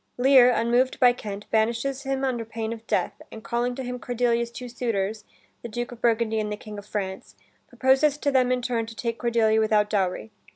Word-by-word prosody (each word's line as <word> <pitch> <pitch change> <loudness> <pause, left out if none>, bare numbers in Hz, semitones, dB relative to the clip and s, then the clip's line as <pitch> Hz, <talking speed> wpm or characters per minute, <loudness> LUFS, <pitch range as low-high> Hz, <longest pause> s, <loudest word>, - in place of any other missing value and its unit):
Lear, 255 -1 +6
unmoved 245 +2 +1
by 245 -1 +6
Kent, 205 -4 -7
banishes 235 +5 0
him 270 -1 -2
under 250 -3 -1
pain 225 0 -4
of 225 0 -11
death, - - -1
and 220 - -10
calling 240 +3 -1
to 265 - -5
him 250 0 -5
Cordelia's 235 0 0
two 250 +1 -8
suitors, 220 -4 -2 0.4
the 235 - -7
Duke 240 +3 -4
of 240 - -11
Burgundy 225 -1 +1
and 210 -1 -2
the 210 - -3
King 210 -1 -9
of 205 - -13
France, 190 -3 -5 0.3
proposes 265 +4 +2
to 290 -1 0
them 255 -2 +3
in 250 -1 0
turn 230 -2 -1
to 225 - -10
take 230 0 -3
Cordelia 225 -2 +2
without 215 -1 +2
dowry. 185 - -1
235 Hz, 205 wpm, -25 LUFS, 220-250 Hz, 0.4 s, Lear